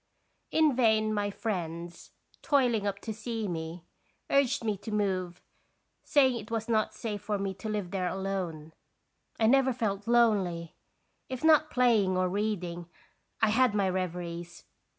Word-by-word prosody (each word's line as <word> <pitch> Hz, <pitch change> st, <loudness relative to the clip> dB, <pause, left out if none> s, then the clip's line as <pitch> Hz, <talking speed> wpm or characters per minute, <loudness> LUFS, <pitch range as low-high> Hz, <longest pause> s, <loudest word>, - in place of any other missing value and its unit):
In 310 Hz, -4 st, +3 dB
vain 220 Hz, -3 st, +3 dB
my 205 Hz, -1 st, 0 dB
friends, 175 Hz, -5 st, -5 dB, 0.3 s
toiling 245 Hz, -8 st, +2 dB
up 200 Hz, -1 st, -2 dB
to 220 Hz, -, -4 dB
see 225 Hz, 0 st, -4 dB
me, 165 Hz, 0 st, -5 dB, 0.5 s
urged 275 Hz, -4 st, +2 dB
me 215 Hz, -2 st, 0 dB
to 210 Hz, -, -9 dB
move, 185 Hz, -4 st, -1 dB, 0.6 s
saying 265 Hz, -4 st, +3 dB
it 215 Hz, -, -10 dB
was 225 Hz, -1 st, -2 dB
not 220 Hz, -1 st, +1 dB
safe 215 Hz, -2 st, -4 dB
for 205 Hz, +1 st, -2 dB
me 195 Hz, -1 st, -2 dB
to 215 Hz, +3 st, -7 dB
live 205 Hz, -4 st, -3 dB
there 185 Hz, -2 st, -1 dB
alone. 180 Hz, -5 st, -4 dB, 0.7 s
I 225 Hz, -, +3 dB
never 265 Hz, +3 st, +4 dB
felt 210 Hz, -4 st, -2 dB
lonely. 200 Hz, -9 st, +2 dB, 0.6 s
If 260 Hz, +1 st, -5 dB
not 310 Hz, -1 st, +5 dB
playing 220 Hz, -7 st, +3 dB
or 185 Hz, 0 st, +1 dB
reading, 180 Hz, -4 st, -3 dB, 0.5 s
I 220 Hz, -, +5 dB
had 240 Hz, 0 st, +3 dB
my 200 Hz, -2 st, +2 dB
reveries. 175 Hz, -2 st, -5 dB
205 Hz, 150 wpm, -29 LUFS, 180-230 Hz, 0.7 s, not